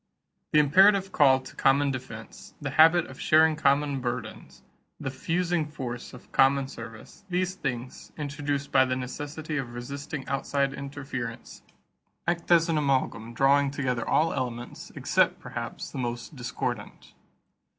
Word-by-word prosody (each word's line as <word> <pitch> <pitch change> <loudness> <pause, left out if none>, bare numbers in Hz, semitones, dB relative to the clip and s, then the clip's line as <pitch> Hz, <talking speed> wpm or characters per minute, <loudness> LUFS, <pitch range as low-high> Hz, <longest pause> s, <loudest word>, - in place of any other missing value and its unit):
The - - +4
imperative 190 +6 +5
call 135 -5 +5
to - - -12
common 140 +1 +3
defense, 115 -4 -8
the 145 -2 -4
habit 165 +3 +6
of 130 - -12
sharing 160 0 +5
common 140 -1 +2
burdens, 120 -1 -5 0.4
the 135 - -3
fusing 170 +3 -1
force 125 -5 -6
of 125 - -14
common 135 0 +4
service 115 - -10
these 185 +1 0
things, 125 -8 -5
induced 145 -1 -3
by 130 -1 +6
the 130 -1 0
necessity 145 +4 -5
of 120 -3 -4
resisting 140 +3 -6
outside 140 0 0
interference, 135 -4 -6 0.6
act 170 0 -1
as 170 -1 +5
an 160 -2 +1
amalgam 130 -5 -1
drawing 140 +2 +4
together 130 -4 -2
all 160 +2 +3
elements, 120 -2 -5
except, - - +2
perhaps, - - -6
the - - -5
most 120 +4 -4
discordant. 120 -3 -5
140 Hz, 140 wpm, -27 LUFS, 125-150 Hz, 0.6 s, habit